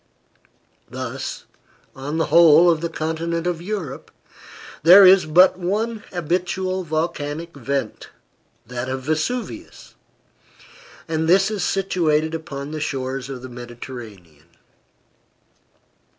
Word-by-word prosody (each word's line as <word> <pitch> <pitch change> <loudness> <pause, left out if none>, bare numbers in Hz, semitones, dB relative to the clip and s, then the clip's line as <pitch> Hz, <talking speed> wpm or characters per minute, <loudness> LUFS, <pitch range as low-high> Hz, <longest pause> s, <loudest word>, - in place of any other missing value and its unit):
Thus, - - -6 0.5
on 145 +4 -4
the 160 - +1
whole 170 +1 +7
of 160 -2 -1
the 170 - -2
continent 165 +1 -3
of 175 -2 -2
Europe, 175 -8 -5 0.7
there 185 +5 +9
is 185 -3 +6
but 180 +4 +5
one 215 +5 -2
habitual 185 +2 -2
volcanic 160 0 -3
vent 135 -3 -4 0.6
that 125 +2 -5
of 130 0 -4
Vesuvius 225 - -4 1.1
and 160 0 -1
this 195 +4 +4
is 210 -4 -2
situated 165 -5 0
upon 145 -3 -6
the 155 -1 -5
shores 135 -2 -4
of 130 -2 -7
the 130 - -8
Mediterranean. 115 - -11
160 Hz, 110 wpm, -21 LUFS, 135-180 Hz, 1.1 s, there